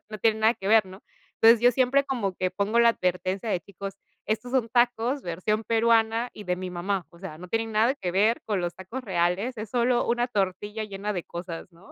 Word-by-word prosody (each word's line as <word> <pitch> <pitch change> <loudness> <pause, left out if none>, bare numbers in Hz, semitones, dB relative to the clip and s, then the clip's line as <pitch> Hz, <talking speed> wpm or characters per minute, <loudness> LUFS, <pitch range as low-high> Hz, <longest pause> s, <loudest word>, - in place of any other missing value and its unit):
No 215 -1 -7
tiene 220 +1 +2
nada 225 +2 +4
que 195 - -5
ver, 220 -2 +5
¿no? 190 +2 -12 0.4
Entonces 230 0 +7
yo 245 +1 +5
siempre 265 +3 +3
como 230 -9 -2
que 185 0 -1
pongo 205 +4 0
la 235 0 +7
advertencia 185 +2 -2
de: 185 - +1
"Chicos, 195 +1 -8 0.3
estos 220 +4 -2
son 245 -4 +1
tacos 245 +2 +2
versión 210 +6 -2
peruana 230 +1 +2
y 210 - -10
de 180 -1 -1
mi 185 0 -5
mamá, 180 +1 -2
o 170 - -18
sea, 185 -5 -8
no 180 0 -10
tienen 225 +1 -1
nada 225 +5 +3
que 185 -11 -4
ver 210 +5 +2
con 205 -4 0
los 175 0 -3
tacos 205 +9 -7
reales, 190 +6 0
es 215 0 -5
solo 245 0 +2
una 240 +1 +1
tortilla 205 +1 -2
llena 205 +1 -4
de 180 - -3
cosas", 170 -1 -7
¿no? 170 +3 -18
215 Hz, 220 wpm, -26 LUFS, 185-235 Hz, 0.4 s, Entonces